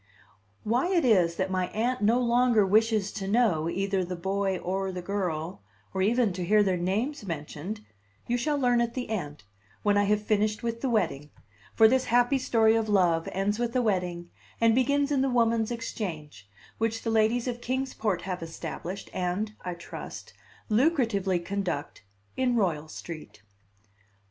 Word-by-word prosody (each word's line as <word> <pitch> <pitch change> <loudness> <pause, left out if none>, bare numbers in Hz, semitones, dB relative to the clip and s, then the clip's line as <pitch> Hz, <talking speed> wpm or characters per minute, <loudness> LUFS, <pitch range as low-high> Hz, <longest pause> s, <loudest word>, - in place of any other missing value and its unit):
Why 240 +9 +1
it 345 -6 +2
is 180 -8 +4
that 190 +1 -1
my 185 -1 0
Aunt 240 +6 -1
no 225 +4 +3
longer 240 -3 +3
wishes 215 0 +2
to 195 -3 -5
know 195 -8 +2
either 195 +2 0
the 180 +1 -4
boy 190 +2 -1
or 190 +2 -2
the 180 - -5
girl, 175 - -3 0.3
or 190 - -1
even 225 0 +2
to 180 0 -4
hear 210 +4 +4
their 190 -2 +1
names 215 - -1
mentioned, 170 +4 -5 0.4
you 240 - 0
shall 290 +5 0
learn 245 -3 +3
at 235 0 -2
the 250 -3 -4
end, 150 - -4 0.4
when 205 -1 +3
I 205 - +3
have 210 +1 +1
finished 215 +1 0
with 230 0 -3
the 270 - 0
wedding; 165 - 0 0.5
for 220 - +7
this 260 +3 +2
happy 245 +3 +3
story 225 -3 +3
of 225 -1 0
love 175 -5 +2
ends 200 +3 -1
with 240 0 -2
a 255 - +3
wedding, 180 -5 -1 0.3
and 230 -1 +4
begins 280 +4 +2
in 275 -2 +2
the 270 - +2
Woman's 230 -2 +2
Exchange, 160 - -6 0.3
which 225 0 -1
the 225 - -1
ladies 225 +3 +2
of 240 -1 -3
Kings 260 +2 -2
Port 210 -5 -1
have 180 -1 -4
established, 170 +3 -6
and 185 +4 -2
(I 180 -1 -4
trust) 170 - -9 0.3
lucratively 215 - +1
conduct, 195 -7 -3 0.3
in 255 -2 +1
Royal 165 -8 0
Street. 155 -8 -9
210 Hz, 170 wpm, -28 LUFS, 180-235 Hz, 0.5 s, for